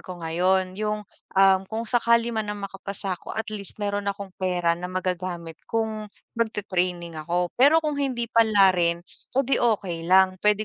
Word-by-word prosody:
ko 185 - -8
ngayon 185 +3 0
yung 210 0 -2 0.3
ang 190 0 +5
kung 225 +1 -3
sakali 235 0 +2
man 220 -2 -2
na 210 - -3
makapasa 195 -1 -5
ako 180 - -7
at 220 -1 -3
least 200 -2 -5
meron 205 -1 -2
akong 200 -1 -5
pera 180 -2 +1
na 175 +2 -5
magagamit 180 -3 -4
kung 220 -1 -2 0.2
magti-training 180 -7 -2
ako. 175 +3 -1
Pero 300 +6 +5
kung 295 -2 -1
hindi 255 -4 -1
palarin 190 -6 +4 0.3
oh, 270 - +4
'di 270 - +1
okey 185 -8 0
lang, 185 0 +4
puwede 210 0 +2
195 Hz, 165 wpm, -25 LUFS, 180-220 Hz, 0.3 s, ang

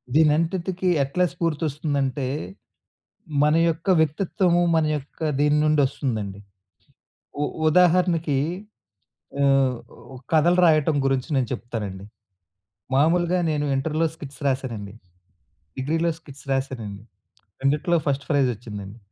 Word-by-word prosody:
దీనంతటికీ 170 +4 +2 0.2
ఎట్లా 180 +7 +1
స్ఫూర్తోస్తుందంటే, 150 -4 -1 1.2
మన 150 +1 +4 0.2
యొక్క 165 +4 -3
వ్యక్తిత్వము, 175 +3 +1
మన 160 -1 +3
యొక్క 140 0 -13 0.2
దీన్నుండి 150 0 +3
ఒస్తుందండి. 110 -8 -4 1.0
ఉ - - +1 0.2
ఉదాహరణకి 170 -3 +3 1.1
ఆహ్, 135 -2 +3 0.6
కథలు 175 +3 +4
రాయటం 155 -2 +3
గురించి 135 0 0
నేను 125 -3 0
చెప్తానండి. 105 -5 -6 0.9
మామూలుగా 175 +5 +3
నేను 150 -1 -1
ఇంటర్‌లో 155 +4 0
స్కిట్స్ 140 -2 -10
రాశానండి. 115 -7 -3 0.9
డిగ్రీలో 160 +5 0
స్కిట్స్ 140 -4 -14
రాశానండి. 115 -7 -4 0.6
రెండిట్లో 150 +5 +2
ఫస్ట్ 140 0 0
ఫ్రైజ్ 140 -4 +3
ఒచ్చిందండి. 105 -1 -9
145 Hz, 95 wpm, -23 LUFS, 130-165 Hz, 1.2 s, మన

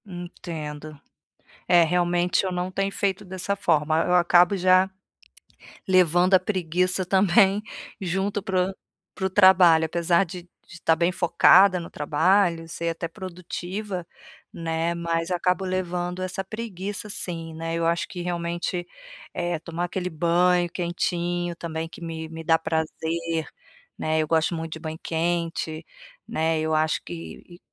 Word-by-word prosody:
Entendo. 155 -5 -7 0.7
É, 175 -1 +6
realmente 175 +2 +1
eu 190 - -1
não 180 0 -2
tenho 195 +1 -1
feito 195 -1 -1
dessa 190 +1 -3
forma, 160 -4 +1
eu 180 - +1
acabo 175 +2 +5
já 185 +1 +4 1.0
levando 180 0 +4
a 190 - +8
preguiça 185 -1 +1
também 195 +2 +4 0.4
junto 195 +3 -1
para 185 -1 0
o - - -11 0.4
para 190 - -4
o - - +1
trabalho. 185 -4 +6
Apesar 170 +3 +2
de 175 0 -9 0.2
de 175 - -13
tá 160 - +3
bem 170 +2 +1
focada 180 +1 +5
no 165 - -8
trabalho, 165 +3 +1
ser 170 0 -4
até 165 +1 -4
produtiva, 185 +1 -6 0.5
né, 165 0 -2
mas 165 0 -2
acabo 180 +1 0
levando 180 -1 -2
essa 185 +1 -4
preguiça 205 -1 -5
sim, 165 -4 -4
né. 165 +1 -4
Eu 165 0 -1
acho 170 +1 0
que 180 - -7
realmente, 175 0 -3 0.5
eh, 175 -2 -2
tomar 170 +2 -5
aquele 180 +1 -3
banho 175 +2 +2
quentinho, 175 0 -2
também 165 -1 -5
que - - -12
me 160 -1 -6
me 165 0 -7
dá 165 0 +3
prazer, 160 0 -2 0.5
né, 155 0 0
eu 155 - 0
gosto 160 +2 +1
muito 165 0 -5
de 160 - -7
banho 160 0 -6
quente, 165 -1 -2 0.4
né, 160 0 0
eu 160 0 -1
acho 155 0 +1
que 175 +1 -10
175 Hz, 145 wpm, -24 LUFS, 165-185 Hz, 1.0 s, a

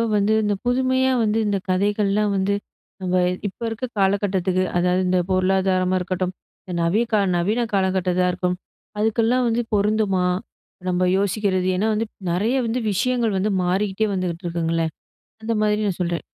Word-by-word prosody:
வந்து 205 +1 +2
இந்த 210 -1 +1
புதுமையா 260 +1 +2
வந்து 215 +1 +1
இந்த 205 -1 +1
கதைகள்லாம் 205 +2 +1
வந்து, 195 +1 +1 0.5
நம்ப 185 -1 -1 0.3
இப்ப 195 - -9
இருக்குற 230 +3 -4
காலகட்டத்துக்கு, 190 -2 +1
அதாவது 180 +1 +2
இந்த 180 0 +2
பொருளாதாரமா 185 0 +2
இருக்கட்டும், 185 0 -2 0.3
இந்த 180 - -7
நவிய 175 +7 +2 0.3
நவீன 215 +7 +1
காலகட்டத்துல 185 -2 +1
இருக்கட்டும் 180 0 -1 0.4
அதுக்கெல்லாம் 230 +3 +2
வந்து 230 +1 +1
பொருந்துமா? 205 -2 +2 0.6
நம்ம 180 0 +1
யோசிக்குறது 195 -2 0
ஏன்னா, 215 +4 +1
வந்து 225 +1 -1 0.2
நெறைய 210 +9 +1
வந்து, 230 +3 -1
விஷயங்கள் 230 +1 +1
வந்து 210 +3 0
மாறிக்கிட்டே 195 +3 0
வந்துகிட்டு 180 -1 -3
இருக்குங்கள்ல. 165 -1 0 0.6
அந்த 225 +1 -1
மாதிரி 210 0 +1
நான் 190 -3 -2
சொல்லுறேன். 170 -1 -1
195 Hz, 140 wpm, -22 LUFS, 185-215 Hz, 0.6 s, வந்து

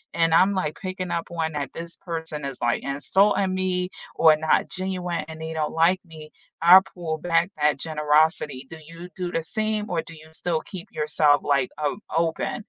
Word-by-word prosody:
And 165 -1 +2
I'm, 190 +4 +5
like, 185 -5 -2
picking 185 -1 -5
up 170 - -3
on 160 -2 -2
that 140 -3 -4
this 170 +1 -6
person 160 -4 -5
is 135 -2 -6
like 120 0 +1
insulting 190 +8 +2
me, 185 -1 -1 0.3
or 160 -1 +6
not 155 0 +2
genuine, 180 -3 -3
and 160 0 -9
they 160 0 -5
don't 155 -1 -2
like 170 +4 +3
me. 155 -2 -12 0.3
I'll 180 +3 +9
pull 170 -4 -5
back 175 +2 +1
that 150 -1 +3
generosity. 150 -3 +1
Do 160 - -9
you 165 +3 -10
do 180 -2 -3
the 165 - -1
same, 215 +4 -1
or 170 -2 0
do 165 - -11
you 155 0 -15
still 160 -1 -1
keep 185 -4 -9
yourself, 150 -1 +2
like, 140 -3 +1
o 150 +6 -2 0.2
open? 165 +7 -1
165 Hz, 190 wpm, -24 LUFS, 155-180 Hz, 0.3 s, I'll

